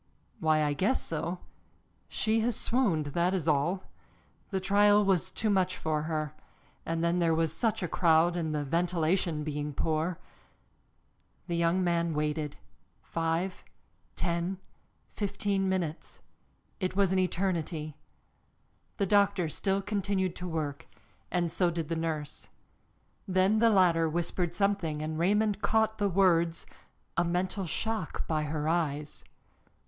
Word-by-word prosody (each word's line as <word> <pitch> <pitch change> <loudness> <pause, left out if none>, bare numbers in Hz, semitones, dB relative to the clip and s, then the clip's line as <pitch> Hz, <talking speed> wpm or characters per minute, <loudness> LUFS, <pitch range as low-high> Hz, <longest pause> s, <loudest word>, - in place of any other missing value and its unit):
"Why, 155 -3 +3
I 145 -1 +1
guess 195 - +1
so. 170 +3 -3 0.7
She 220 +1 +1
has 230 0 +1
swooned, 205 - +1
that 175 +2 +2
is 170 -4 -2
all. 160 +6 +1 0.7
The 195 - -1
trial 205 +2 +4
was 185 -2 +2
too 215 +2 -1
much 185 -2 +1
for 155 -1 -1
her. 155 -1 -2 0.5
And 165 0 -1
then 170 +1 +2
there 165 -2 +3
was 160 -1 +1
such 225 -5 0
a - - 0
crowd, 170 0 +3
and 165 -3 -1
the 150 - -1
ventilation 170 0 +1
being 150 -1 -4
poor 160 +3 0 0.6
" - - -41
The 170 - -1
young 170 +2 +2
man 170 -2 +1
waited, 150 -1 -2 0.5
five, 165 +3 -2 0.5
ten, 170 +2 -1 0.6
fifteen 200 -1 -1
minutes 175 -5 -3 0.6
it 185 -2 -2
was 200 -1 +3
as - - 0
an 190 - +3
eternity. 170 -4 -1 1.0
The 200 - +1
doctor 200 -3 +3
still 195 +5 0
continued 195 -3 -1
to 180 - -5
work, 155 -4 -4 0.4
and 175 -2 0
so 180 0 +2
did 165 -2 -3
the 165 - 0
nurse. 155 -2 -4 0.8
Then 190 +3 +3
the 230 0 +5
latter 175 -5 +4
whispered 175 +1 -1
something 190 -7 0
and 155 0 -3
Raymond 210 +3 +2
caught 220 +1 +1
the 205 -1 +2
words, 170 -3 +2 0.5
"a 170 - +3
mental 180 +2 -1
shock, 220 0 -2
by 155 -2 0
her 150 0 -2
eyes." 150 -3 -1
175 Hz, 140 wpm, -29 LUFS, 160-195 Hz, 1.0 s, the